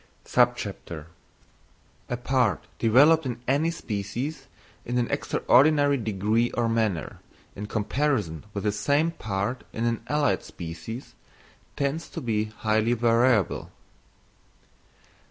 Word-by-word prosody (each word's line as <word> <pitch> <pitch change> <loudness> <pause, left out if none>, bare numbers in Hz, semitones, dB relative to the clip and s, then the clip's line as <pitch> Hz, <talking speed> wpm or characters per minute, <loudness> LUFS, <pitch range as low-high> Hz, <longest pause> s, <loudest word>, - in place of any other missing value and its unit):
_A 80 -3 0 1.2
Part 120 - +1
developed 140 +7 +5
in 120 -1 -4
any 145 +5 +2
Species 120 0 -4 0.4
in 125 +1 -2
an 120 -1 +1
extraordinary 145 +1 +3
degree 110 +1 +1
or 120 -1 +1
manner, 110 -7 -1 0.4
in 105 +1 -6
comparison 110 - -1
with 100 -1 -4
the 105 - +2
same 145 +10 +1
part 110 -2 -3
in 115 0 -1
allied 150 -2 +1
Species, 85 +9 -8 0.6
tends 145 +4 -2
to - - -6
be 110 -3 0
highly 110 +1 0
variable. 115 -2 +2
115 Hz, 100 wpm, -26 LUFS, 105-135 Hz, 1.2 s, developed